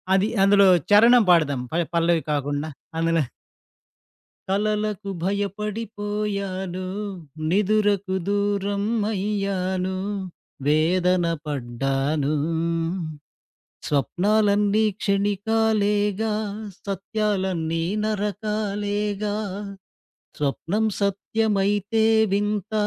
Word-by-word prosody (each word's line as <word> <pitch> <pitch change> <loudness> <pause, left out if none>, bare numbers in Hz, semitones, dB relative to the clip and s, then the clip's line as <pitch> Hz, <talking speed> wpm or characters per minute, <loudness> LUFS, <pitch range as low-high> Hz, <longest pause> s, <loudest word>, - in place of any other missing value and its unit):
అది 195 +2 +3 0.2
అందులో 200 0 +6 0.2
చరణం 230 +3 +7
పాడదాం, 145 -6 +3
పల్ 170 +1 +1
పల్లవి 170 -1 +3
కాకుండా 145 +1 -1 0.3
అందులో 165 -1 +2 1.3
కలలకు 210 0 -1
భయపడిపోయాను, 200 -2 -3 0.6
నిదురకు 205 0 +2
దూరం 200 0 0 0.3
అయ్యాను, 190 -2 -1 0.7
వేదన 175 +4 +3 0.2
పడ్డాను. 135 +2 -1 1.5
స్వప్నాలన్నీ 205 - +2 0.2
క్షణికాలేగా, 205 +1 +1 0.5
సత్యాలన్నీ 190 -4 -1 0.2
నరకాలేగా. 210 -1 -2 1.0
స్వప్నం 165 +9 -1 0.2
సత్యమైతే 205 +1 +1 0.3
వింత, 205 +1 -1
200 Hz, 60 wpm, -24 LUFS, 180-210 Hz, 1.5 s, చరణం